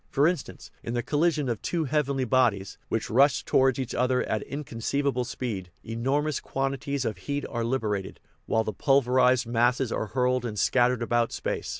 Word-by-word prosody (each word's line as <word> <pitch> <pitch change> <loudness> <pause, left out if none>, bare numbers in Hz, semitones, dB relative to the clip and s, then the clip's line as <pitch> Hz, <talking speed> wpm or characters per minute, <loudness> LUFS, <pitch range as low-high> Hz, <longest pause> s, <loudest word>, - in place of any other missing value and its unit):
For 140 0 +2
instance, 165 -5 -4
in 115 - -4
the 120 - -1
collision 150 +1 +1
of 115 -4 -2
two 170 -2 -1
heavenly 140 -3 0
bodies, 115 -6 +1
which 110 -3 -2
rush 135 +4 +4
towards 130 -1 +3
each 130 -3 -3
other 125 +1 +1
at 110 - -2
inconceivable 135 0 -2
speed, 110 -7 -4
enormous 135 +7 -1
quantities 135 0 -2
of 110 - -2
heat 145 0 -3
are 120 -3 -3
liberated, 110 -6 -2 0.3
while 110 - +2
the 110 - -4
pulverized 130 0 +3
masses 120 +1 +1
are 110 - -2
hurled 125 +2 +1
and 110 -3 -4
scattered 125 +1 +2
about 120 0 +1
space. - - -3
125 Hz, 170 wpm, -27 LUFS, 115-140 Hz, 0.3 s, rush